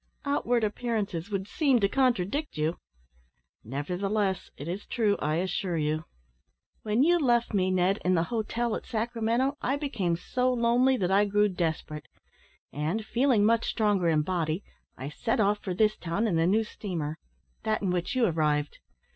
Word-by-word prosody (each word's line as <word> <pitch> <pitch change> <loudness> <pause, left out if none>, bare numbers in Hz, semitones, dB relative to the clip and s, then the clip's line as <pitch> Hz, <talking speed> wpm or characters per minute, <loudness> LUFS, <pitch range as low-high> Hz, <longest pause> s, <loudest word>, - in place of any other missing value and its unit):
"Outward 245 -4 +1
appearances 210 -5 -2
would 195 -1 -3
seem 285 -7 +2
to 200 - +3
contradict 255 - 0
you." 155 +3 -1 0.8
"Nevertheless, 190 - -2
it 145 - -7
is 185 +4 -5
true, 215 -4 +1
I 155 +1 0
assure 180 0 -1
you. 155 +1 -1 0.8
When 220 +4 +2
you 345 +3 +4
left 240 -5 +2
me, 185 -2 +2
Ned, 185 +2 +2
in 185 0 +3
the 165 - +2
hotel 230 +1 -1
at - - -7
Sacramento, 235 +4 0
I 265 - 0
became 220 - -1
so 255 +7 0
lonely 245 +2 +3
that 185 -3 0
I 200 +2 +4
grew 205 +1 +2
desperate; 160 -4 -3 0.7
and, 160 +10 -2
feeling 245 -4 +3
much 230 +1 +2
stronger 205 -5 +2
in 155 -2 +2
body, 165 +1 -1 0.3
I 135 +2 -5
set 225 - -1
off 205 0 +2
for 185 -3 -4
this 215 +2 +3
town 180 +6 -1
in 200 -6 +1
the 165 +1 +3
new 215 +4 +3
steamer 165 -8 -5 0.4
that 215 -1 -1
in 190 - +1
which 180 +8 -1
you 250 -2 +3
arrived. 150 -5 0
205 Hz, 165 wpm, -28 LUFS, 175-235 Hz, 0.8 s, you